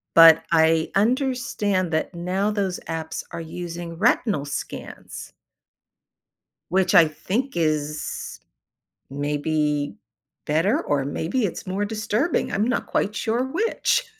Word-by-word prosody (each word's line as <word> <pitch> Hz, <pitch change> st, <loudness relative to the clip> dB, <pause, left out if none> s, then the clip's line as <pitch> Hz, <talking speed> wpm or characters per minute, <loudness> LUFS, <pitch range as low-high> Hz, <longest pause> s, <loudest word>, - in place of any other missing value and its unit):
But 165 Hz, -1 st, +9 dB
I 160 Hz, 0 st, +3 dB
understand 215 Hz, -, +1 dB
that 160 Hz, +3 st, -1 dB
now 185 Hz, +4 st, -1 dB
those 195 Hz, -3 st, -1 dB
apps 160 Hz, -1 st, -4 dB
are -, -, -5 dB
using 170 Hz, 0 st, -6 dB
retinal 215 Hz, -, +2 dB
scans. 145 Hz, -, -7 dB, 1.4 s
Which 190 Hz, +1 st, +2 dB
I 170 Hz, -4 st, +8 dB
think 205 Hz, -, -3 dB
is 155 Hz, -2 st, -2 dB, 0.7 s
maybe 145 Hz, -2 st, -1 dB, 0.5 s
better 190 Hz, -, +1 dB
or 140 Hz, -2 st, 0 dB
maybe 170 Hz, -, -1 dB
it's 180 Hz, -, -6 dB
more 195 Hz, +2 st, -1 dB
disturbing. 220 Hz, +8 st, -1 dB
I'm 205 Hz, -, +1 dB
not 250 Hz, -, 0 dB
quite 205 Hz, -, 0 dB
sure 230 Hz, +4 st, 0 dB
which. 455 Hz, -, +1 dB
175 Hz, 115 wpm, -23 LUFS, 160-215 Hz, 1.4 s, But